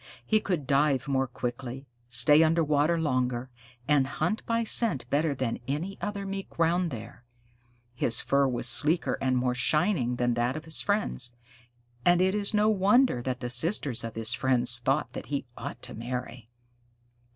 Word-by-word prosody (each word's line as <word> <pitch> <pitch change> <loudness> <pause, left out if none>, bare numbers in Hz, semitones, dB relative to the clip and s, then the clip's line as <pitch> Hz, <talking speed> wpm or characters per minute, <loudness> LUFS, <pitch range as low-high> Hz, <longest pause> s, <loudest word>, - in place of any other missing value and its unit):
He 215 - +3
could 180 -9 -3
dive 140 0 +1
more 135 -1 0
quickly, 125 +2 -6 0.2
stay 125 +6 +4
under 165 +1 +3
water 150 +2 +1
longer, 130 -4 -1 0.4
and 140 -2 +3
hunt 175 +10 -2
by 230 0 0
scent 220 - 0
better 150 0 +1
than 130 -3 -3
any 165 +8 -4
other 200 -1 -4
Mink 195 0 -7
round 170 +1 +1
there. 120 -1 -9 0.7
His 115 -1 -1
fur 140 0 +2
was 125 -1 -1
sleeker 150 +6 +3
and 130 -1 +1
more 125 0 0
shining 125 - +1
than 120 0 0
that 120 +3 -1
of 155 - -9
his 160 - +1
friends, 200 - 0 0.7
and 175 +3 +4
it 190 +1 +2
is 205 -1 +1
no 210 0 +2
wonder 210 - +3
that 125 0 -4
the 120 -1 -4
sisters 130 - +4
of 115 -1 -6
his 115 +1 +1
friends 125 -2 +1
thought 130 +2 -1
that - - -7
he 140 -2 -3
ought - - -8
to - - -7
marry. 120 0 -6
140 Hz, 170 wpm, -27 LUFS, 125-170 Hz, 0.7 s, stay